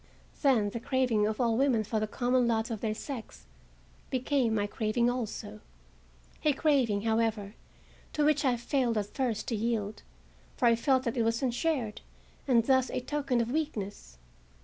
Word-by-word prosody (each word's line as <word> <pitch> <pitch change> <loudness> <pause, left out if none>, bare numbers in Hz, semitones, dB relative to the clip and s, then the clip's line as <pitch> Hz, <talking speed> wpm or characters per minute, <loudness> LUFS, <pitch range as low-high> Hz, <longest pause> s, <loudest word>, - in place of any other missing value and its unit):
Then 235 -8 +3
the 235 - -4
craving 235 -4 +1
of 215 0 -3
all 235 -2 +2
women 250 -3 +2
for 215 +1 -1
the 215 - -1
common 245 +2 +1
lot 225 0 0
of 220 - -4
their 215 -2 -1
sex 225 - -8 0.6
became 255 -3 +1
my 205 -1 +1
craving 225 +3 0
also; 225 - -5 0.8
a 300 - +4
craving, 260 -9 +2
however, 220 -2 0 0.6
to 300 - +1
which 300 0 +3
I 255 -3 +2
failed 240 -1 0
at 205 -1 -3
first 245 -5 -1
to 235 - 0
yield, 215 -1 -2 0.6
for - - +1
I 230 - +5
felt 260 +2 +2
that 235 0 -2
it - - +2
was 230 +2 0
unshared, 250 -3 -1 0.5
and 240 -4 +4
thus 260 -1 +3
a - - -2
token 275 -2 0
of 235 +1 -2
weakness. 210 - -4
235 Hz, 170 wpm, -30 LUFS, 220-260 Hz, 0.8 s, I